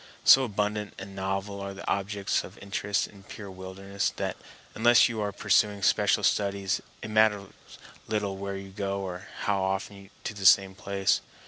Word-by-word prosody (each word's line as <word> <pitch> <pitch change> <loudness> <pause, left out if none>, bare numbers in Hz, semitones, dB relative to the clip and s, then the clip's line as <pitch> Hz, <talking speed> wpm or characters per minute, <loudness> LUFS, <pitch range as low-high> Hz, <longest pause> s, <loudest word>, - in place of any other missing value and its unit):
So 135 - +8
abundant 105 -1 -2
and 95 0 -9
novel 95 +1 -3
are 100 0 -5
the 100 - -9
objects 100 0 0
of - - -11
interest 100 +1 -1
in 100 - -14
a - - -15
pure 100 0 -9
wilderness 95 +1 -3
that - - -2 0.4
unless 120 +1 +6
you 115 -2 -3
are 105 -1 -1
pursuing 100 0 +2
special - - +3
studies 100 -1 +1 0.2
it 110 - -6
matters 105 -2 +3 0.6
little 105 -3 -1
where 100 0 -4
you 95 0 -9
go, 100 0 -3
or 90 -1 -6
how 100 -2 +1
often 95 +1 -3
to 115 - -4
the 100 -2 +2
same 95 0 +6
place. 100 0 0
100 Hz, 170 wpm, -28 LUFS, 95-105 Hz, 0.6 s, So